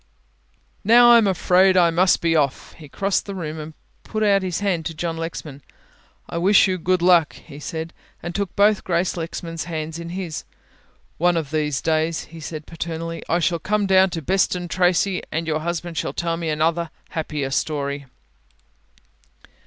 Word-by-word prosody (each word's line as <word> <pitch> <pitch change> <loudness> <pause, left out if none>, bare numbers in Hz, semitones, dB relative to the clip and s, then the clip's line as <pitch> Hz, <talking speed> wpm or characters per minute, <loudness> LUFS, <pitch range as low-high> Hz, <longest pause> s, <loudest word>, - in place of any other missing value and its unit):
"Now 240 +3 +7
I 235 - +8
am 215 - +2
afraid 185 +1 +3
I 170 -2 +5
must 180 +3 +3
be 165 -1 +2
off," 140 -4 0
he 150 -3 -13
crossed 195 +7 -1
the 200 - -5
room 160 -3 -5
and 155 0 -8 0.3
put 215 0 -3
out 200 -2 +4
his 185 -3 -2
hand 190 -5 0
to 165 - -7
John 165 +1 -3
Lexman. 165 -3 -6 0.7
"I 170 - -4
wish 195 +4 +5
you 185 -1 -1
good 180 +1 +1
luck," 175 -3 +5
he 140 - -12
said, 160 +1 -5 0.3
and 170 - -4
took 200 -1 -3
both 205 0 +3
Grace 175 0 0
Lexman's 165 -1 -5
hands 160 -1 -5
in 170 0 -7
his. 175 -3 -5 0.8
"One 175 +1 +3
of 150 -3 -3
these 150 -3 -1
days," 160 0 0
he 165 +1 -12
said 155 -1 -7
paternally, 165 0 -5
"I 170 - +3
shall 170 0 0
come 210 +3 0
down 190 0 +5
to 165 -3 -5
Beston 180 0 0
Tracey 180 +1 +2
and 165 +1 -2
your 155 -1 -1
husband 170 +1 -3
shall - - -3
tell 170 -1 -1
me 165 -1 -3
another 160 +2 +1
and 165 - -7 0.2
a - - -18
happier 150 -4 -3
story." 140 -1 -2
170 Hz, 185 wpm, -22 LUFS, 160-185 Hz, 0.8 s, I